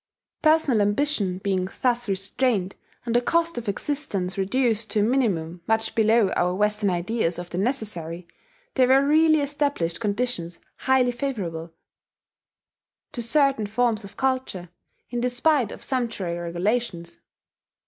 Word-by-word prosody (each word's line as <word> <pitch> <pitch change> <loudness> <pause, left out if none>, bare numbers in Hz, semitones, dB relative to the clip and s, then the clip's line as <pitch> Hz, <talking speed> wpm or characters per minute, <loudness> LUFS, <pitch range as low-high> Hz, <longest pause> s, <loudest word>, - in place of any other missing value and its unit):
Personal 310 -8 +3
ambition 205 -3 +1
being 190 -1 -1
thus 245 -3 +1
restrained, 195 +1 0 0.3
and 235 -1 -1
the 240 - +5
cost 335 +1 +1
of 225 - -5
existence 200 -6 -3
reduced 225 +2 0
to 210 +1 +1
a - - +3
minimum 190 -9 0
much 220 0 0
below 220 -2 +3
our 180 +1 +1
Western 210 0 +1
ideas 180 0 -1
of 175 0 -7
the 175 - -2
necessary, 190 - -3 0.5
there 255 -2 +4
were 270 +2 +5
really 310 +1 +4
established 285 - -1
conditions 205 -6 -2 0.2
highly 260 -1 +2
favourable 190 -11 -4 1.4
to 245 - -4
certain 265 -2 +2
forms 225 0 +1
of 200 - -12
culture, 260 -9 -1 0.4
in 240 -1 -2
despite 250 0 +2
of - - -8
sumptuary 230 -9 -2
regulations. 175 +1 -2
220 Hz, 130 wpm, -24 LUFS, 185-260 Hz, 1.4 s, the